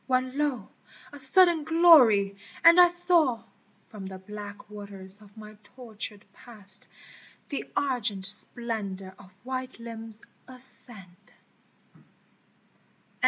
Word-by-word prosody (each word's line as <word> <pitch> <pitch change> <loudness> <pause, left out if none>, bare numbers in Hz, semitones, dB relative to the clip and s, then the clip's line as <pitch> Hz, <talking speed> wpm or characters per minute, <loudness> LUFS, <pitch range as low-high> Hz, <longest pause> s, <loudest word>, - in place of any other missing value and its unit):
When 255 0 -4
lo! 280 -8 -5 0.4
a 290 - -13
sudden 335 +4 +5
glory! 290 - +2 0.3
and 335 +2 +5
I 355 - +5
saw 345 -8 +3 0.5
From 200 -3 -12
the 190 0 -11
black 205 +1 -13
waters 200 -1 -11
of 205 0 -22
my 215 0 -15 0.2
tortured 220 -4 -8
past 205 -4 0 0.6
The 280 - -8
argent 230 -8 -4
splendor 200 -2 +1
of 190 - -19
white 255 0 -9
limbs 225 -1 -3 0.2
ascend 240 -7 -16
225 Hz, 105 wpm, -23 LUFS, 200-265 Hz, 0.6 s, sudden